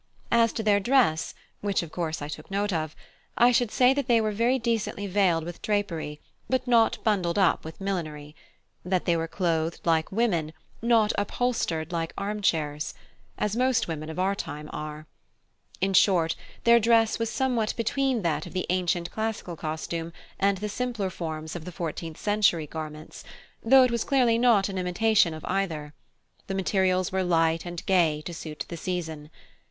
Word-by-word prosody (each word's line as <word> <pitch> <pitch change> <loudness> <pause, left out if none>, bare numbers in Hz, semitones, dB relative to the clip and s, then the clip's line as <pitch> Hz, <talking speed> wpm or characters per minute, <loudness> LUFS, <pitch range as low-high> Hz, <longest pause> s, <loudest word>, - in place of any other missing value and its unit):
As 230 -1 +4
to 220 - -3
their 205 -1 +4
dress, 215 -8 +2 0.2
which 200 -3 0
of 165 - -9
course 160 -3 -3
I - - -4
took 150 - -8
note 200 0 -1
of, 155 -2 -2 0.4
I 240 +1 +6
should 245 -1 +2
say 250 +3 +4
that 280 -2 -2
they 235 -2 +5
were 215 -1 0 0.2
decently 230 -4 -1
veiled 185 -4 +2
with 175 +1 -8
drapery, 170 -8 -2 0.3
and 260 - +4
not 235 -3 +4
bundled 195 -5 +1
up 190 -4 +3
with 160 0 -9
millinery; 155 -6 -4 0.5
that 180 0 0
they 170 - +3
were 165 0 -1
clothed 165 -2 -1
like 160 -1 +2
women, 185 -8 0 0.3
not 230 -2 +3
upholstered 205 -8 -1
like 165 -1 -2
armchairs, 165 -8 -1 0.4
as 210 0 -1
most 255 0 +2
women 155 -1 -5
of 160 - -7
our 190 +2 +1
time 150 -5 -6
are. 150 0 -6 0.8
In 195 +1 +1
short, 175 -4 +4 0.3
their 235 0 +6
dress 225 0 +3
was 230 -1 -1
somewhat 245 -5 0
between 250 0 0
that 165 -3 -1
of - - -11
the 185 - -1
ancient 175 -1 0
classical 220 -5 -3
costume 165 +1 -4 0.3
and 200 0 +2
the 210 +3 -3
simpler 220 -3 -2
forms 160 -1 -5
of 170 - -6
the 180 - -7
fourteenth 165 -2 -5
century 205 -6 +2
garments, 155 0 -8 0.4
though 265 +3 +7
it 250 - +2
was 235 -1 0
clearly 245 -5 +3
not 230 -5 +4
an 190 -2 -4
imitation 185 +1 +3
of 155 - -9
either: 160 -6 -2 0.5
the 195 - -3
materials 185 -1 +1
were 190 0 0
light 165 -1 +1
and 175 0 -6
gay 165 -6 +2
to 175 - -5
suit 155 -2 -6
the 170 - -6
season. 160 -4 -4
185 Hz, 170 wpm, -26 LUFS, 160-220 Hz, 0.8 s, though